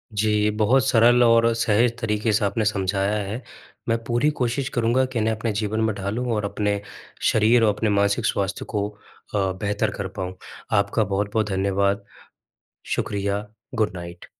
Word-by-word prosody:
जी 105 Hz, 0 st, +2 dB
बहुत 125 Hz, +5 st, +4 dB
सरल 120 Hz, 0 st, +5 dB
और 115 Hz, 0 st, +5 dB
सहज 115 Hz, +1 st, +2 dB
तरीक़े 110 Hz, -1 st, 0 dB
से 105 Hz, 0 st, +2 dB
आपने 110 Hz, +2 st, 0 dB
समझाया 100 Hz, 0 st, 0 dB
है 110 Hz, +6 st, -4 dB, 0.5 s
मैं 115 Hz, -, +3 dB
पूरी 120 Hz, +5 st, +1 dB
कोशिश 125 Hz, +2 st, 0 dB
करूँगा 120 Hz, +2 st, +2 dB
कि 130 Hz, -2 st, -3 dB
इन्हें 110 Hz, +1 st, +1 dB
अपने 110 Hz, +1 st, -2 dB
जीवन 105 Hz, +1 st, -1 dB
में 110 Hz, -1 st, +1 dB
ढालूँ 100 Hz, +5 st, -3 dB
और 105 Hz, -1 st, -1 dB
अपने 100 Hz, 0 st, -1 dB, 0.5 s
शरीर 115 Hz, +2 st, +4 dB
और 105 Hz, -2 st, +4 dB
अपने 110 Hz, +1 st, 0 dB
मानसिक 100 Hz, +2 st, +1 dB
स्वास्थ्य 100 Hz, -2 st, -1 dB
को 105 Hz, -1 st, -2 dB, 0.5 s
अ, 95 Hz, -2 st, +1 dB
बेहतर 100 Hz, 0 st, 0 dB
कर 100 Hz, -, -3 dB
पाऊँ। 95 Hz, 0 st, -6 dB, 0.4 s
आपका 110 Hz, +2 st, +1 dB
बहुत-बहुत 105 Hz, +2 st, -1 dB
धन्यवाद। 100 Hz, +1 st, 0 dB, 0.9 s
शुक्रिया, 100 Hz, +1 st, -2 dB, 0.3 s
गुड 110 Hz, -2 st, +1 dB
नाइट। 85 Hz, 0 st, -8 dB
105 Hz, 160 wpm, -23 LUFS, 100-115 Hz, 0.9 s, सरल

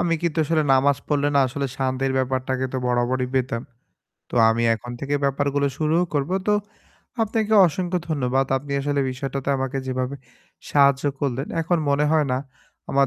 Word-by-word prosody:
আমি 170 Hz, -1 st, +1 dB
কিন্তু 170 Hz, -1 st, -1 dB
আসলে 155 Hz, +1 st, +1 dB
নামাজ 135 Hz, +1 st, +4 dB
পড়লে 145 Hz, -1 st, +1 dB
না -, -, +5 dB
আসলে 140 Hz, +2 st, -3 dB
শান্তির 135 Hz, 0 st, -1 dB
ব্যাপারটাকে 130 Hz, 0 st, -1 dB
তো -, -, -2 dB
বরাবরই 125 Hz, +1 st, +1 dB
পেতাম। 125 Hz, -2 st, 0 dB, 0.7 s
তো -, -, -6 dB
আমি 115 Hz, +1 st, +1 dB
এখন 120 Hz, +2 st, -8 dB
থেকে 140 Hz, +1 st, -2 dB
ব্যাপারগুলো 140 Hz, +1 st, +1 dB
শুরুও 160 Hz, +3 st, +2 dB
করব। 145 Hz, +3 st, 0 dB, 0.2 s
তো 210 Hz, -, +3 dB, 0.7 s
আপনাকে 220 Hz, 0 st, 0 dB
অসংখ্য 180 Hz, +2 st, -1 dB
ধন্যবাদ। 135 Hz, -3 st, 0 dB
আপনি 140 Hz, +1 st, -5 dB
আসলে 145 Hz, 0 st, 0 dB
বিষয়টাতে 135 Hz, +1 st, -4 dB
আমাকে 135 Hz, 0 st, -2 dB
যেভাবে 130 Hz, +1 st, -2 dB, 0.5 s
সাহায্য 140 Hz, -1 st, +4 dB, 0.2 s
করলেন, 135 Hz, 0 st, -1 dB
এখন 170 Hz, +1 st, +1 dB
মনে 140 Hz, +1 st, +2 dB
হয় 155 Hz, -3 st, +3 dB
না 125 Hz, -, +1 dB, 0.5 s
আমার 140 Hz, 0 st, +3 dB
140 Hz, 160 wpm, -23 LUFS, 130-150 Hz, 0.7 s, না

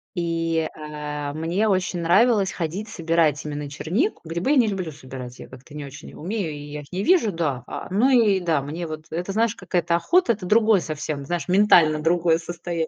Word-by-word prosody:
И, 165 Hz, -1 st, -1 dB
э, 160 Hz, -, -2 dB
а, 150 Hz, -1 st, -5 dB
мне 170 Hz, +7 st, 0 dB
очень 185 Hz, -3 st, 0 dB
нравилось 200 Hz, +4 st, +3 dB
ходить, 180 Hz, +5 st, -4 dB
собирать 165 Hz, -5 st, +1 dB
именно 145 Hz, -1 st, -4 dB
чернику. 190 Hz, -, -1 dB
Грибы 170 Hz, -, -1 dB
я 295 Hz, -, +4 dB
не 240 Hz, -3 st, +5 dB
люблю 185 Hz, -5 st, -3 dB
собирать, 130 Hz, -3 st, -9 dB
я -, -, -9 dB
как-то 130 Hz, +3 st, -14 dB
не 150 Hz, -1 st, -5 dB
очень 140 Hz, +1 st, -10 dB
и -, -, -14 dB
умею, 185 Hz, 0 st, -3 dB
и 150 Hz, -, -7 dB
я 150 Hz, 0 st, -5 dB
их 140 Hz, -, -16 dB
не 185 Hz, +2 st, -2 dB
вижу. 320 Hz, -, +4 dB
Да, 150 Hz, -8 st, -2 dB
а -, -, -6 dB
но 230 Hz, +7 st, +4 dB
и 225 Hz, -7 st, +4 dB
да, 165 Hz, -5 st, +1 dB
мне 160 Hz, +5 st, -5 dB
вот 155 Hz, 0 st, -7 dB
это, 175 Hz, +4 st, -3 dB
знаешь, 225 Hz, +2 st, +1 dB
какая-то 180 Hz, -3 st, 0 dB
охота, 235 Hz, -, +3 dB
это 200 Hz, -4 st, -8 dB
другое 215 Hz, +1 st, +4 dB
совсем, 155 Hz, -3 st, -4 dB
знаешь, 170 Hz, -1 st, -3 dB
ментально 180 Hz, -5 st, +5 dB
другое 165 Hz, 0 st, +3 dB
состоян 170 Hz, -1 st, -4 dB
170 Hz, 205 wpm, -23 LUFS, 150-195 Hz, -, не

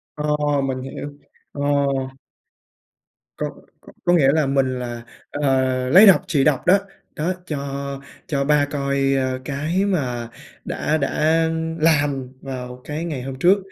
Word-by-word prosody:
Ồ, 150 Hz, -1 st, 0 dB
mình 130 Hz, -1 st, -2 dB
hiểu. 135 Hz, +2 st, -6 dB, 0.4 s
Ồ. 145 Hz, -1 st, +1 dB, 1.5 s
Có -, -, -3 dB, 0.3 s
có -, -, -16 dB
có 175 Hz, -, +3 dB
nghĩa 140 Hz, -5 st, +5 dB
là 155 Hz, -1 st, +2 dB
mình 135 Hz, -2 st, +1 dB
là, 120 Hz, -1 st, -5 dB, 0.3 s
ờ, 130 Hz, -3 st, +1 dB
lấy 190 Hz, +10 st, +8 dB
độc 195 Hz, -1 st, +7 dB
trị 150 Hz, -7 st, +2 dB
độc 140 Hz, -3 st, +1 dB
đó. 190 Hz, +3 st, +6 dB, 0.4 s
Đó, 165 Hz, +5 st, 0 dB
cho 150 Hz, -3 st, -3 dB, 0.7 s
cho 140 Hz, -2 st, -1 dB
ba 145 Hz, 0 st, +3 dB
coi, 140 Hz, -1 st, 0 dB
ơ, 130 Hz, -1 st, 0 dB
cái 155 Hz, +8 st, -1 dB
mà 125 Hz, -12 st, -1 dB, 0.4 s
đã 155 Hz, +1 st, -1 dB
đã 160 Hz, +3 st, +2 dB, 0.3 s
làm 145 Hz, -5 st, +2 dB
vào 125 Hz, -2 st, -7 dB
cái 150 Hz, +3 st, -4 dB
ngày 145 Hz, -7 st, -4 dB
hôm 130 Hz, 0 st, -6 dB
trước, 185 Hz, +8 st, +5 dB
140 Hz, 145 wpm, -21 LUFS, 130-155 Hz, 1.5 s, lấy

